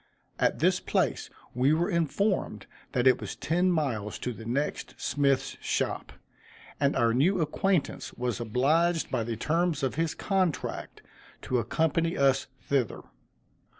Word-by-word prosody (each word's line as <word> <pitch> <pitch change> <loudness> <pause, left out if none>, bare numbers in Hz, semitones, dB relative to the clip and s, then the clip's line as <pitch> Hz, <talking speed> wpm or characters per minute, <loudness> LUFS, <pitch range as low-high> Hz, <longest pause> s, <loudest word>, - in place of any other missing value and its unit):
At - - +2
this - - +3
place - - 0 0.2
we 130 +4 +3
were 170 +3 +1
informed 170 +5 0 0.3
that 125 0 +1
it 130 - +5
was - - -5
ten 175 +4 +1
miles 125 - -1
to 125 - -4
the 110 0 -9
next 140 +5 -2
smith's 140 -2 +1
shop, - - -2 0.7
and 140 0 +2
our 115 -1 +3
new 175 +10 +3
acquaintance 170 +2 0
was 125 -3 -2
obliged 155 +9 +1
by 115 - 0
the 115 0 -4
terms 160 +2 0
of 135 - 0
his 165 -2 -1
contract, 190 -5 -2 0.4
to 125 - 0
accompany 160 +7 0
us 135 -1 +3 0.2
thither. 135 -6 0
145 Hz, 140 wpm, -28 LUFS, 125-165 Hz, 0.7 s, it